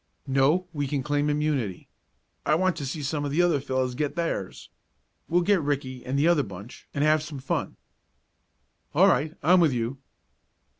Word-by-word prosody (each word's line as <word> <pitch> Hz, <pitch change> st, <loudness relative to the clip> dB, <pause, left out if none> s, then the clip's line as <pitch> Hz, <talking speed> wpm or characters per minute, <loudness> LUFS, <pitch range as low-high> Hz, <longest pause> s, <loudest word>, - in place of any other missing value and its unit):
"No, 140 Hz, +7 st, +2 dB
we 145 Hz, -2 st, -2 dB
can 135 Hz, -1 st, -2 dB
claim 145 Hz, +1 st, 0 dB
immunity. 145 Hz, -10 st, -1 dB, 0.6 s
I 155 Hz, -, +3 dB
want 185 Hz, +2 st, +1 dB
to 140 Hz, -3 st, -4 dB
see 145 Hz, +3 st, -4 dB
some 145 Hz, +1 st, -2 dB
of 145 Hz, -, -2 dB
the 160 Hz, +5 st, +2 dB
other 170 Hz, -5 st, +3 dB
fellows 130 Hz, -2 st, -1 dB
get 145 Hz, +3 st, -2 dB
theirs. 165 Hz, -, -3 dB, 0.6 s
We'll 175 Hz, +1 st, +3 dB
get 195 Hz, -1 st, +3 dB
Ricky 135 Hz, -3 st, -3 dB
and 130 Hz, +2 st, -2 dB
the 145 Hz, +4 st, +3 dB
other 170 Hz, -4 st, +4 dB
bunch 100 Hz, 0 st, -10 dB
and 140 Hz, -, -1 dB
have 155 Hz, 0 st, +4 dB
some 155 Hz, -1 st, -7 dB
fun." 135 Hz, 0 st, -3 dB, 1.2 s
"All -, -, +6 dB
right; 150 Hz, +6 st, +2 dB
I'm 180 Hz, +5 st, +6 dB
with 160 Hz, -6 st, +4 dB
you." 120 Hz, +3 st, -2 dB
145 Hz, 180 wpm, -26 LUFS, 130-155 Hz, 1.2 s, All